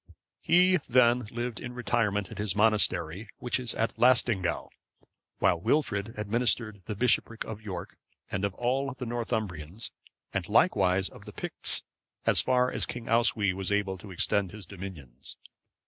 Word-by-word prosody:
He 180 +2 +5
then 125 -4 +3
lived 120 0 -4
in 120 -1 -7
retirement 105 -5 0
at - - -8
his 105 -2 -1
monastery, 105 -3 +2
which 125 +1 -1
is 125 -3 -3
at 115 - -1
Laestingaeu,(544) 120 -8 +3 0.7
while 85 -2 +2
Wilfrid 110 - 0
administered 110 -1 +1
the 105 - -4
bishopric 115 0 +1
of 110 -1 -7
York, 95 -5 -7 0.3
and 95 - -2
of 100 -1 -1
all 135 +3 0
the 125 - -5
Northumbrians, 110 -6 -3 0.4
and - - -2
likewise 95 0 +3
of - - -12
the - - -9
Picts, - - -1 0.4
as - - +5
far 125 0 +2
as - - 0
King 120 -1 -6
Oswy 115 -4 +3
was 95 +1 -3
able 100 -2 0
to 100 - -11
extend 95 +1 +1
his 105 -3 -8
dominions. 85 -10 -8
110 Hz, 150 wpm, -29 LUFS, 95-120 Hz, 0.7 s, He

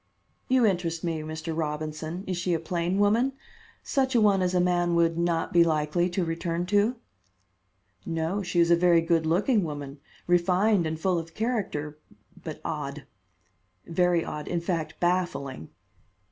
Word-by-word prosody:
"You 255 -2 +4
interest 175 -5 0
me, 165 -2 -1
Mr. 160 +1 -5
Robinson. 155 +2 -4
Is 185 - -2
she 175 0 0
a - - -1
plain 170 +2 -1
woman? 225 +6 +3 0.5
Such 265 -1 0
a - - +6
one 205 -3 +4
as 185 0 0
a - - +4
man 175 -1 +2
would 165 -1 +3
not 170 -1 -1
be 170 -1 +7
likely 160 +2 +1
to 175 0 -1
return 170 +1 -2
to?" 205 +5 +3 1.1
"No, 165 +4 -2
she 175 -2 -1
is 170 0 +4
a - - +8
very 170 -1 +4
good 165 -1 +1
looking 205 +6 +2
woman, 145 -3 -6 0.3
refined 180 +2 +3
and 155 0 -4
full 180 0 +1
of 165 0 -9
character, 195 -11 -2 0.4
but - - -6
odd, - - -4 0.8
very 175 0 +1
odd, 150 0 -6
in 170 - -1
fact, 170 -2 -3
baffling." 175 - -1
170 Hz, 160 wpm, -27 LUFS, 160-185 Hz, 1.1 s, a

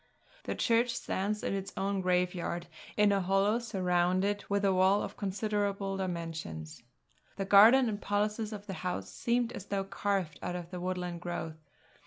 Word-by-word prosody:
The - - -2
church 235 0 +2
stands 210 +1 -2
in - - -1
its 195 0 -3
own 195 0 0
graveyard, 180 -1 0 0.3
in 210 -1 +5
a 200 -1 +2
hollow 195 +4 +2
surrounded 185 -1 +1
with 200 0 +1
a 195 - +4
wall 190 +2 +4
of - - -6
considerable 200 -1 -1
dimensions. 165 - -5 0.5
The 195 - -3
garden 225 +7 +7
and 210 -2 -3
policies 210 +1 -1
of 205 -1 -7
the 195 - -5
house 100 - -3
seem 235 - 0
as 195 - -8
though 200 -1 -1
carved 195 -4 -2
out 180 - -3
of 175 -1 -6
the 180 - -5
woodland 180 -1 -3
growth. 165 -2 -5
195 Hz, 165 wpm, -31 LUFS, 180-205 Hz, 0.5 s, garden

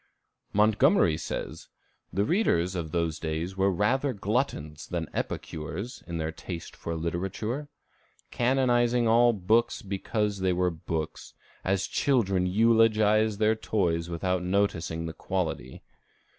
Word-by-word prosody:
Montgomery 110 - +4
says, 80 - -5 0.4
"The 100 +2 +1
readers 95 - +2
of 85 -4 -4
those 85 -2 -1
days 80 +3 -3
were 95 +1 +2
rather 130 +9 +1
gluttons 100 - -2
than - - -3
epicures 90 - -5
in 85 -1 -4
their 80 0 -2
taste 85 +1 -8
for 85 - -5
literature," 95 - -3 0.6
canonizing 120 -1 +2
all 120 +1 +5
books 110 +3 +1
because 100 +1 -2
they 95 -1 +1
were 90 0 +1
books, 80 -1 -5 0.3
as 95 0 +1
children 100 -9 +1
eulogize 110 0 +3
their 110 +1 +3
toys 85 -6 -1
without 90 +2 -1
noticing 90 -4 0
the 80 - -5
quality. 80 -11 -3
95 Hz, 120 wpm, -28 LUFS, 85-115 Hz, 0.6 s, all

